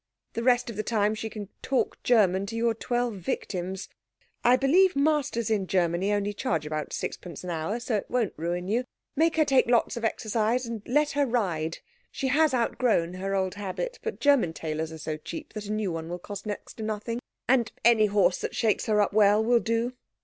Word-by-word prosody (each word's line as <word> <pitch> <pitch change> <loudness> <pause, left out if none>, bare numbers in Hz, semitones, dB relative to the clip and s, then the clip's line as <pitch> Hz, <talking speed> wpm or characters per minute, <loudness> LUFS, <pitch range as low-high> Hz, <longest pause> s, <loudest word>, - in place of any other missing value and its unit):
The 230 - -2
rest 245 0 +3
of - - -10
the - - +1
time 215 -1 +1
she 220 +1 -4
can 210 -3 -7
talk 265 -1 -1
German 200 -5 +3
to 225 - -5
your 230 0 +2
twelve 240 -1 -1
victims. 185 +1 -4 0.6
I 245 +1 +6
believe 335 +8 +4
masters 280 -6 +1
in 200 -3 +1
Germany 180 +2 +1
only 205 0 0
charge 165 - -1
about 155 -1 -3
6d. 170 -3 -5
an 180 - -4
hour, 165 +8 -2
so 235 -2 -1
it - - -6
won't 240 -5 0
ruin 175 +3 -3
you. 235 +5 0 0.3
Make 325 +3 +3
her 315 -1 +4
take 270 -4 +4
lots 240 0 +2
of 235 - -5
exercise, 225 +2 0
and 230 -2 -5
let 295 +4 +2
her 285 -1 +1
ride. 175 -9 -1 0.3
She 265 - -2
has 305 +3 +4
outgrown 230 -7 +1
her 195 +2 -2
old 190 -1 0
habit, 205 - -4
but 455 - -4
German 275 - +3
tailors 160 0 -3
are 160 - -7
so 155 0 -4
cheap 305 - -8
that 210 -1 -6
a - - -3
new 215 -3 -1
one 165 0 -5
will 175 - -3
cost 200 +3 -8
next 205 - -6
to 220 - -5
nothing, 220 +2 -3 0.3
and 240 -4 +3
any 225 -2 +6
horse 195 -3 +3
that - - -4
shakes 220 +1 +1
her 215 -1 +3
up 205 - +1
well 210 0 +5
will 240 0 +4
do. 230 +2 -1
215 Hz, 210 wpm, -27 LUFS, 190-245 Hz, 0.6 s, I